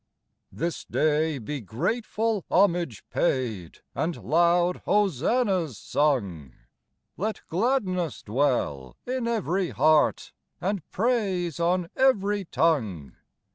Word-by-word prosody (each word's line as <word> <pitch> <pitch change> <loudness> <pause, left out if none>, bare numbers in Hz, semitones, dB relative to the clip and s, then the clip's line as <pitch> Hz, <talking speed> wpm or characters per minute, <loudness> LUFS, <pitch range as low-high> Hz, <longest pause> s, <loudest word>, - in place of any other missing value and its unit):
This 170 +1 -3
day 155 0 +1
be 135 +4 -5
grateful 210 - -1
homage 175 - +1
paid, 115 - -1
And 165 +1 -1
loud 175 +2 +3
hosannas 190 - +1
sung; 100 - -1 0.6
Let 215 +2 -3
gladness 185 - 0
dwell 110 - -1
in 255 -1 -2
every 195 -5 0
heart, 155 +2 +2 0.3
And 195 0 -1
praise 190 - 0
on 175 +1 +1
every 205 -6 +2
tongue. 110 - 0
170 Hz, 95 wpm, -26 LUFS, 140-200 Hz, 0.6 s, loud